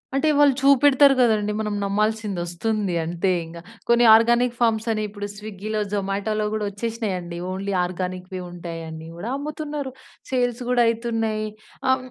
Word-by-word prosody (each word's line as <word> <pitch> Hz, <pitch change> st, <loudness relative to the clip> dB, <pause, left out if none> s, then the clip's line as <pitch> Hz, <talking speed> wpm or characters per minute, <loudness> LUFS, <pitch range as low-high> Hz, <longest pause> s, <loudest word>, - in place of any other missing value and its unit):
అంటే, 310 Hz, +3 st, +2 dB
వాళ్ళు 290 Hz, -2 st, +6 dB
చూపెడతారు 275 Hz, 0 st, +6 dB
కదండీ! 215 Hz, -4 st, +3 dB
మనం 210 Hz, -1 st, -2 dB
నమ్మాల్సింది 210 Hz, -1 st, 0 dB
వస్తుంది 200 Hz, +2 st, -2 dB
అంతే 170 Hz, +3 st, -1 dB
ఇంక. 165 Hz, +1 st, -10 dB, 0.3 s
కొన్ని 235 Hz, 0 st, +5 dB
ఆర్గానిక్ 235 Hz, +2 st, +4 dB
ఫామ్స్ 225 Hz, -1 st, +1 dB
అని 215 Hz, -1 st, -1 dB
ఇప్పుడు 205 Hz, 0 st, -6 dB
స్విగ్గీలో, 215 Hz, +1 st, -5 dB
జొమాటోలో 205 Hz, +2 st, -1 dB
కూడా 215 Hz, -1 st, -1 dB
వచ్చేసినాయండి. 200 Hz, -5 st, -4 dB
ఓన్లీ 195 Hz, +1 st, -3 dB
ఆర్గానిక్‌వి 185 Hz, +1 st, -4 dB
ఉంటాయండి, 165 Hz, -2 st, -7 dB
అవి 165 Hz, -, -11 dB
కూడా 225 Hz, -, -4 dB
అమ్ముతున్నారు. 295 Hz, -1 st, -4 dB, 0.4 s
సేల్స్ 245 Hz, -1 st, 0 dB
కూడా 250 Hz, -1 st, +3 dB
అయితున్నాయి. 225 Hz, -2 st, -1 dB, 0.4 s
ఆహ్, 260 Hz, 0 st, +3 dB
215 Hz, 140 wpm, -23 LUFS, 190-240 Hz, 0.4 s, వాళ్ళు